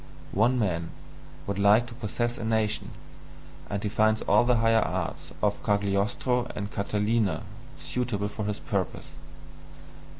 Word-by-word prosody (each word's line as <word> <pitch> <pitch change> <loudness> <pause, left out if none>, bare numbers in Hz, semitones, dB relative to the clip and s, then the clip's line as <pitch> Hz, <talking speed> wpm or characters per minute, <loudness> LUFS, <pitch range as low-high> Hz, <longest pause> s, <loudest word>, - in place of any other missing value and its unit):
One 115 +6 +3
man 85 -7 0 0.6
would 100 0 -3
like 105 +4 +5
to 120 - -10
possess 120 0 -2
a - - -4
nation, 110 -1 0 0.8
and 100 0 -3
he - - 0
finds 110 +1 +2
all - - +4
the 125 0 +4
higher 115 0 +4
arts - - -3
of - - +1
Cagliostro 105 +5 +1
and 100 0 -4
Catalina 105 +1 0 0.3
suitable 115 -5 -2
for 105 0 -5
his 105 0 -2
purpose. 95 -3 -2
105 Hz, 135 wpm, -27 LUFS, 100-115 Hz, 0.8 s, like